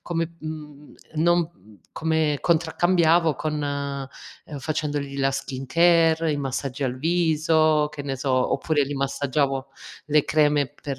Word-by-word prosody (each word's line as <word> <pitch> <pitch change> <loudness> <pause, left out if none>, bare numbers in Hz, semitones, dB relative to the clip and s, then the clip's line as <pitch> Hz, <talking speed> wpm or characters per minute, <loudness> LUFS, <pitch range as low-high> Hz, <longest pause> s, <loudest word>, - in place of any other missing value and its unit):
come 165 -1 -3
mhmm, 150 -2 -9 0.2
non 170 +1 +2 0.4
come 160 -2 0
contraccambiavo 170 -1 +2
con 150 +1 -3
ehm, 140 0 -6
facendogli 145 -1 -3
la 135 0 +2
skincare, 160 +5 +2
i - - -1
massaggi 135 0 -3
al 125 0 -2
viso, 155 -1 +2
che 145 - -6
ne 135 -1 -3
so, 135 +1 -2 0.2
oppure 150 -4 +1
gli 145 - -4
massaggiavo 135 0 -1 0.4
le 150 -1 +3
creme 150 -2 +2
per, 135 +2 -7
150 Hz, 125 wpm, -24 LUFS, 140-160 Hz, 0.4 s, le